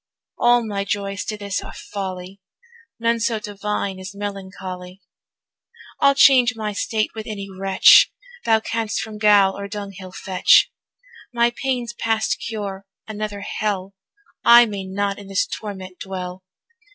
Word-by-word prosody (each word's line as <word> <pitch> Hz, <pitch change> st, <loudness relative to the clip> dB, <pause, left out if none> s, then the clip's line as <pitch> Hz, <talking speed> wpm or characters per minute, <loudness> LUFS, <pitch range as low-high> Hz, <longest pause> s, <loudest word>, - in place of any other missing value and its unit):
All 240 Hz, -1 st, +4 dB
my 200 Hz, -2 st, -2 dB
joys 200 Hz, 0 st, -3 dB
to 215 Hz, -, -4 dB
this 200 Hz, -2 st, -3 dB
are -, -, -10 dB
folly, 190 Hz, -1 st, -7 dB, 0.6 s
None 230 Hz, 0 st, +1 dB
so 225 Hz, 0 st, 0 dB
divine 205 Hz, -2 st, -4 dB
as 190 Hz, +1 st, -8 dB
melancholy. 190 Hz, -2 st, -7 dB, 1.0 s
I'll 280 Hz, 0 st, +5 dB
change 255 Hz, -3 st, +6 dB
my 215 Hz, -2 st, -3 dB
state 215 Hz, +1 st, -1 dB
with 220 Hz, -1 st, -7 dB
any 200 Hz, -3 st, -5 dB
wretch, 195 Hz, 0 st, +6 dB, 0.3 s
Thou 220 Hz, -1 st, +3 dB
canst 225 Hz, -1 st, -2 dB
from 215 Hz, -1 st, -6 dB
gaol 205 Hz, -2 st, +5 dB
or 200 Hz, 0 st, -6 dB
dunghill 200 Hz, -2 st, -8 dB
fetch; 185 Hz, 0 st, +3 dB, 0.6 s
My 235 Hz, 0 st, +2 dB
pain's 250 Hz, -3 st, -2 dB
past 225 Hz, -2 st, 0 dB
cure, 200 Hz, -3 st, -5 dB, 0.2 s
another 210 Hz, -1 st, -5 dB
hell, 200 Hz, -2 st, -3 dB, 0.5 s
I 240 Hz, 0 st, +8 dB
may 200 Hz, -3 st, -5 dB
not 200 Hz, +1 st, -2 dB
in 200 Hz, -, -11 dB
this 195 Hz, -1 st, +1 dB
torment 190 Hz, -3 st, -7 dB
dwell! 185 Hz, -1 st, -6 dB
205 Hz, 140 wpm, -21 LUFS, 195-220 Hz, 1.0 s, I